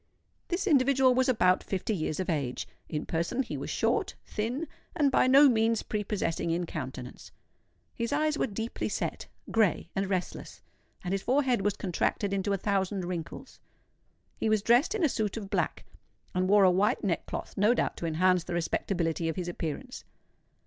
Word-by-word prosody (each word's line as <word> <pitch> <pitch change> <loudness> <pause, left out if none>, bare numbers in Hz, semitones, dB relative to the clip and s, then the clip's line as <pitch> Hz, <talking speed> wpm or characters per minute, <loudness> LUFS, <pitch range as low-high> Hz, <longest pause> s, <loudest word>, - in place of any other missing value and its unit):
This 360 +3 -1
individual 270 -5 +4
was 260 +1 +2
about 185 -7 +3
fifty 195 +3 -2
years 155 -2 -2
of 185 - -2
age. 135 - -2 0.2
In 150 -1 -3
person 170 +11 -1
he - - -6
was - - -5
short, - - 0
thin, 245 +9 -3 0.3
and 290 -5 +3
by 255 - +4
no 275 +3 +8
means 225 -2 +2
prepossessing 200 -6 -2
in 170 +1 0
countenance. 130 -5 -7 0.6
His 235 -1 -3
eyes 305 +1 +1
were 290 - 0
deeply 225 +2 -4
set, - - -3 0.2
grey, 210 -6 +1
and 195 0 -1
restless; 185 -2 -4 0.4
and 180 - -3
his 195 - 0
forehead 255 -3 +2
was 205 0 0
contracted 195 +2 -1
into 200 +1 -1
a 200 - +2
thousand 195 -1 -1
wrinkles. 175 +9 -6 0.8
He 220 - +1
was 215 -2 +2
dressed 245 - +4
in 415 - -1
a - - +6
suit 220 -5 -2
of 200 -3 -7
black, - - -1 0.5
and 185 +1 0
wore 205 0 +6
a 185 - +6
white 195 +4 +1
neckcloth—no 205 +4 0
doubt - - 0
to 170 - -3
enhance 180 +2 +2
the 175 - -3
respectability 165 -1 -1
of 160 - -3
his 180 -2 -4
appearance. 175 - -5
200 Hz, 170 wpm, -29 LUFS, 175-245 Hz, 0.8 s, no